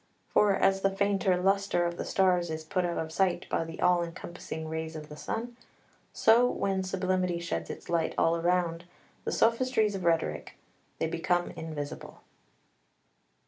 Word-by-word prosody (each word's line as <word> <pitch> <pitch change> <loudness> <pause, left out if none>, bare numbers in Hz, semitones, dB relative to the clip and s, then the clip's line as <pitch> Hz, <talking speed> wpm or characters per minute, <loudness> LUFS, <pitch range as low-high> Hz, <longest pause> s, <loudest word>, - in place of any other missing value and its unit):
For 205 -2 +5
as 195 0 +2
the 195 - +3
fainter 195 -1 +1
lustre 195 -1 +2
of 170 0 -2
the - - -4
stars 180 -3 +2
is 160 0 -4
put 180 +3 -1
out 170 -1 -2
of 160 0 -3
sight 180 0 +1
by - - 0
the 165 0 -8
all 180 -1 +4
encompassing 170 -2 -6
rays 160 0 -4
of 155 -1 -8
the 150 - -8
sun, 235 +9 -4 0.6
so 235 +3 +5
when 195 -4 -1
sublimity 185 -1 0
sheds 85 - -3
its - - -8
light 165 -2 0
all 165 0 +2
round 175 -1 0 0.4
the - - -1
sophistries 230 -2 +2
of 190 -2 -4
rhetoric 165 -1 0 0.4
they - - 0
become 175 +2 0
invisible. 155 -3 -7
175 Hz, 160 wpm, -29 LUFS, 165-195 Hz, 0.6 s, For